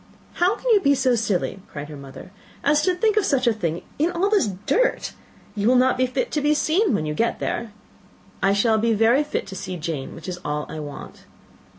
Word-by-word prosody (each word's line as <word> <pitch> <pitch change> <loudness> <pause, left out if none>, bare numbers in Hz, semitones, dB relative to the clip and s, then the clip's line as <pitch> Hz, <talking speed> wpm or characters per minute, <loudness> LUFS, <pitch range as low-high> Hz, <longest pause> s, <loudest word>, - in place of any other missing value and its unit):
"How 365 +4 +2
can - - -16
you 425 - +6
be 280 -6 +3
so 260 -2 +2
silly," 205 -4 -1
cried 145 0 -6
her 150 - -9
mother, 140 +5 -11 0.3
"as 295 +1 +3
to 365 +3 +1
think 430 +3 +1
of 425 - +4
such 275 -8 +1
a 235 - +4
thing, 170 -6 -3 0.2
in 325 +4 +2
all 370 +4 0
this 405 - +3 0.2
dirt! - - +1 0.4
You 205 0 0
will 255 - +5
not 255 +1 +4
be 255 0 +1
fit 255 +1 -2
to 300 - 0
be 295 +1 +3
seen 320 - +2
when 155 - -1
you 150 - -2
get 230 +10 0
there." 235 -2 -3 0.7
"I 195 - +3
shall 220 +2 +3
be 230 +1 +2
very 230 +7 +4
fit 295 - -3
to 190 - -9
see 185 -1 -5
Jane 155 -4 -5
which 165 - -10
is 180 -1 -5
all 150 0 -2
I 155 - -6
want." 145 -2 -9
235 Hz, 230 wpm, -23 LUFS, 180-300 Hz, 0.7 s, you